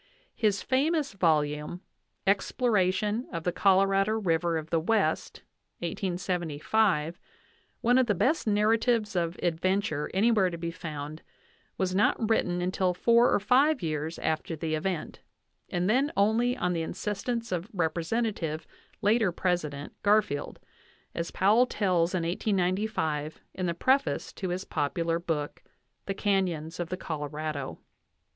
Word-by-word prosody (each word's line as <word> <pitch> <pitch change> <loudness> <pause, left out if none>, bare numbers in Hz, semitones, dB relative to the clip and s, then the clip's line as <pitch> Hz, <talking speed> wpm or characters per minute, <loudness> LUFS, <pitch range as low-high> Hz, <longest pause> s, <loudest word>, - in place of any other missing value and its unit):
His 210 -3 +1
famous 290 +2 +1
volume, 150 -2 0 0.4
"Exploration 205 +1 +1
of 165 -2 -4
the 180 - +1
Colorado 195 +2 +3
River 170 -5 +1
of 155 0 -6
the 165 - +3
West," 185 -2 0 0.4
1875, 175 0 0 0.6
one 245 +2 +4
of 255 - +3
the 210 - +2
best 255 - +1
narratives 215 0 +2
of 170 0 -1
adventure 175 -2 0
anywhere 205 -1 +3
to 170 - -6
be 170 0 -4
found, 155 -2 -7 0.6
was 185 -1 0
not 210 +3 +2
written 180 -5 +1
until 185 0 0
four 235 +5 +4
or - - +3
five 260 - +3
years 155 0 -2
after 160 +1 -2
the 155 0 -3
event, 165 +2 -3 0.5
and 175 +1 0
then 265 +7 +2
only 230 +5 +2
on 180 -5 0
the 165 - -1
insistence 210 +7 -3
of 180 +3 -2
Representative 170 -1 -1 0.4
(later 215 -1 +3
President) 155 -5 -2
Garfield, 205 -9 +1 0.5
as 170 0 -3
Powell 220 +6 +4
tells 185 -5 +1
in 175 - 0
1895 180 -4 -1
in 185 -1 -2
the 170 - -1
preface 265 +9 +1
to 190 - -4
his 185 +2 -3
popular 165 +3 -1
book, 155 -4 -3 0.5
"The 195 - -2
Canyons 180 -5 -1
of 175 -1 -3
the 185 - -3
Colorado." 150 -3 -4
185 Hz, 130 wpm, -28 LUFS, 165-210 Hz, 0.6 s, one